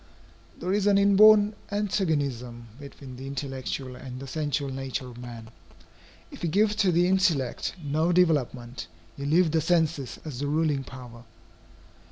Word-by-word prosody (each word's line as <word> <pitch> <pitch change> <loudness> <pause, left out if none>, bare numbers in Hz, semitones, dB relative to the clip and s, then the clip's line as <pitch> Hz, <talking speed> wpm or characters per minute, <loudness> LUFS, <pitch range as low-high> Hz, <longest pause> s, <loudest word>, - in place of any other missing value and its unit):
There 180 +2 -2
is 205 0 +1
an 200 -1 +5
inborn 205 +1 +6 0.2
antagonism 145 - -2
between 140 -2 -11
the 135 +1 -8
intellectual 135 -1 -5
and 130 0 -8
the 135 - -7
sensual 145 -1 -2
nature 135 -1 -4
of 120 -1 -11
man. 120 -2 -9 0.8
If - - -11
you 170 - +1
give 205 +5 +2
to 195 -4 +3
the 175 +1 +3
intellect 180 -11 +1
no 155 +4 +1
development, 130 - 0 0.3
you 140 0 -5
leave 165 +2 +3
the 160 0 +2
senses 160 -5 0
as 140 -6 -6
the 145 - -2
ruling 150 -2 +1
power. 125 -2 -11
145 Hz, 150 wpm, -26 LUFS, 130-180 Hz, 0.8 s, inborn